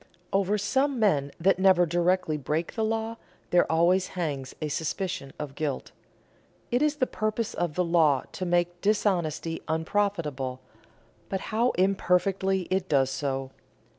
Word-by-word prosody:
Over 195 Hz, +1 st, +2 dB
some 265 Hz, +7 st, +1 dB
men 150 Hz, -11 st, +2 dB
that 185 Hz, +2 st, +3 dB
never 185 Hz, -2 st, +5 dB
directly 175 Hz, 0 st, +1 dB
break 150 Hz, +3 st, -2 dB
the 225 Hz, -, -1 dB
law 225 Hz, +1 st, -1 dB, 0.3 s
there 175 Hz, -2 st, +4 dB
always 175 Hz, +3 st, +3 dB
hangs 145 Hz, -6 st, -3 dB
a 155 Hz, -, -2 dB
suspicion 160 Hz, 0 st, -3 dB
of 150 Hz, -2 st, -6 dB
guilt. 145 Hz, -2 st, -3 dB, 0.8 s
It 245 Hz, +2 st, +2 dB
is 300 Hz, 0 st, +2 dB
the 280 Hz, -3 st, +1 dB
purpose 215 Hz, -1 st, -2 dB
of 170 Hz, -4 st, -2 dB
the 180 Hz, -, +2 dB
law 160 Hz, -5 st, +3 dB
to -, -, -5 dB
make 175 Hz, 0 st, 0 dB
dishonesty 175 Hz, -6 st, 0 dB
unprofitable, 160 Hz, -6 st, -1 dB, 0.7 s
but 190 Hz, -, -1 dB
how 235 Hz, +3 st, +3 dB
imperfectly 190 Hz, 0 st, +2 dB
it 185 Hz, 0 st, 0 dB
does 135 Hz, -2 st, +3 dB
so! 135 Hz, -2 st, -3 dB
180 Hz, 140 wpm, -27 LUFS, 155-195 Hz, 0.8 s, never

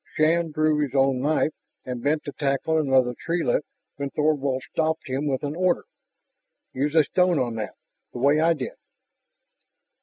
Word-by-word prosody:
Shann 165 Hz, +2 st, +2 dB
drew 155 Hz, 0 st, +1 dB
his 145 Hz, -2 st, -1 dB
own 135 Hz, -1 st, +3 dB
knife 155 Hz, +2 st, +1 dB, 0.3 s
and 125 Hz, -2 st, -4 dB
bent 150 Hz, +4 st, +1 dB
to 145 Hz, -, -5 dB
tackle 140 Hz, +3 st, 0 dB
another 130 Hz, -4 st, +3 dB
treelet 170 Hz, -2 st, 0 dB, 0.3 s
when 140 Hz, 0 st, -3 dB
Thorvald 140 Hz, -3 st, 0 dB
stopped 160 Hz, 0 st, 0 dB
him 135 Hz, +3 st, -2 dB
with 135 Hz, -1 st, -1 dB
an 145 Hz, +1 st, -3 dB
order: 180 Hz, 0 st, +1 dB, 0.9 s
"Use 145 Hz, +4 st, -1 dB
a 160 Hz, -, +7 dB
stone 180 Hz, +1 st, +2 dB
on 120 Hz, -4 st, 0 dB
that, 110 Hz, -, -5 dB, 0.4 s
the -, -, -8 dB
way 140 Hz, +5 st, +3 dB
I 165 Hz, +1 st, +4 dB
did." 130 Hz, -4 st, -5 dB
145 Hz, 160 wpm, -25 LUFS, 135-155 Hz, 0.9 s, a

